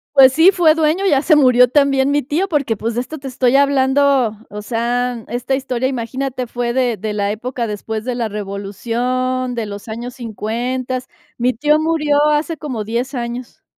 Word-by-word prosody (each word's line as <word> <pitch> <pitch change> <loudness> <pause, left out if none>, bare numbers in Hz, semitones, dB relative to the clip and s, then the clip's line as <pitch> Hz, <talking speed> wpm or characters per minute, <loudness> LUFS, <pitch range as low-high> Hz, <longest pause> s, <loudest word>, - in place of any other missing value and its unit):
Pues, 265 -1 +8
sí, 325 +6 +6
fue 335 -5 +4
dueño, 325 +5 +1
ya 280 -5 +3
se 310 - +5
murió 250 -3 +5
también 280 -1 +3
mi 290 0 +2
tío, 300 +9 -1
porque, 280 - -1
pues, 230 +3 -3
de 240 - -1
esto 280 +5 -7
te 275 -2 -8
estoy 255 0 +1
hablando, 275 -4 +3
o 210 +1 -6
sea, 240 +1 -2
esta 245 +2 -2
historia, 260 -2 -2
imagínate, 260 +1 -3
fue 240 0 -3
de 245 -2 0
de 210 +2 -4
la 205 -1 -1
época 240 +3 -4
después 215 +1 -5
de 250 - -1
la 235 -2 -2
revolución, 235 +6 -2
de 230 -2 -2
los 205 +1 -8
años 235 +3 -6
50. 245 +2 -4 0.3
Mi 250 +2 +2
tío 300 +5 +2
murió 300 -2 +1
hace 305 +2 0
como 260 -7 -4
10 240 +6 -3
años. 240 0 -6
255 Hz, 185 wpm, -18 LUFS, 230-280 Hz, 0.3 s, Pues